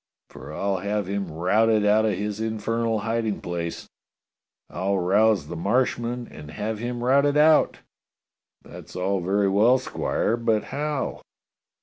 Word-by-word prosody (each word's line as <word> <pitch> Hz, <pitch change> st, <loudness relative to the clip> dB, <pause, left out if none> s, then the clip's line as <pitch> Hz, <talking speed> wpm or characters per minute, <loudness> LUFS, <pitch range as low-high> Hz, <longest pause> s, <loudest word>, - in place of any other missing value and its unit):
For -, -, -10 dB
I'll 95 Hz, +5 st, -1 dB
have 100 Hz, +2 st, -2 dB
him 100 Hz, -2 st, -3 dB
routed 105 Hz, +6 st, +2 dB
out 110 Hz, +1 st, +4 dB
of 110 Hz, -, +1 dB
his 105 Hz, +1 st, -3 dB
infernal 110 Hz, 0 st, -1 dB
hiding 115 Hz, -1 st, -1 dB
place. 85 Hz, -1 st, -5 dB, 0.8 s
I'll 100 Hz, +1 st, -1 dB
rouse 100 Hz, 0 st, +3 dB
the 85 Hz, -, -7 dB
Marshmen 120 Hz, +5 st, -1 dB
and 75 Hz, -1 st, -10 dB
have 105 Hz, +5 st, -4 dB
him 120 Hz, +1 st, -4 dB
routed 140 Hz, +3 st, +3 dB
out." 155 Hz, +1 st, +4 dB, 0.8 s
"That's -, -, -12 dB
all 95 Hz, +2 st, 0 dB
very 100 Hz, +3 st, +1 dB
well. 110 Hz, +6 st, +4 dB
Squire, 115 Hz, -2 st, -1 dB
but 115 Hz, -3 st, +1 dB
how?" 145 Hz, 0 st, -2 dB
105 Hz, 135 wpm, -24 LUFS, 95-115 Hz, 0.8 s, out